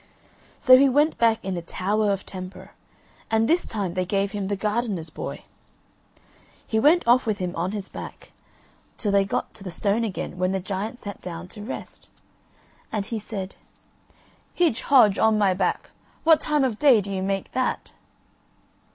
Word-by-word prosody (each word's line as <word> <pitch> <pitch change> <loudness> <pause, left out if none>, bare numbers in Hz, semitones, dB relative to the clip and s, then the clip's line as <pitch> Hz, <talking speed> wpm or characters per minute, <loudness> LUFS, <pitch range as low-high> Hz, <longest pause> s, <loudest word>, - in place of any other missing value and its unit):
So 255 -3 +8
he 275 +1 +5
went 295 +4 +2
back 230 -1 +4
in 190 -1 -2
a 175 - -3
tower 205 +5 -1
of 195 -1 0
a - - -17
temper 185 0 -9 0.6
and 225 0 +2
this 340 +2 +2
time 200 -5 -3
they 185 0 0
gave 195 +2 -1
him 200 -2 -3
the 200 - -1
gardener's 205 -5 -2
boy. - - -6 1.2
He 220 - 0
went 310 +4 +4
off 245 +1 +4
with 215 -2 0
him 180 -2 -4
on 175 +3 -1
his 205 -2 -4
back - - -10 0.7
till 210 - -1
they 200 0 +3
got 195 - -3
to 205 - -11
the 190 - -5
stone 205 +5 0
again 185 -4 -4
when 185 +1 +1
the 190 - 0
giant 200 +5 -4
sat 205 -4 -8
down 175 0 -7
to 210 - -11
rest. 220 +6 -8 0.8
And 210 -2 -2
he 225 +1 -4
said: 195 -2 -6 1.0
"Hidge, 320 -9 +2
Hodge, 235 -8 +5
on 220 -1 +4
my 200 -3 +3
back, 180 0 -1 0.3
what 320 -1 +5
time 300 -2 +1
of 240 -5 -1
day 275 -6 +6
do 200 0 -5
you 190 -1 -2
make 195 0 -2
that?" 255 0 -2
205 Hz, 180 wpm, -24 LUFS, 190-235 Hz, 1.2 s, So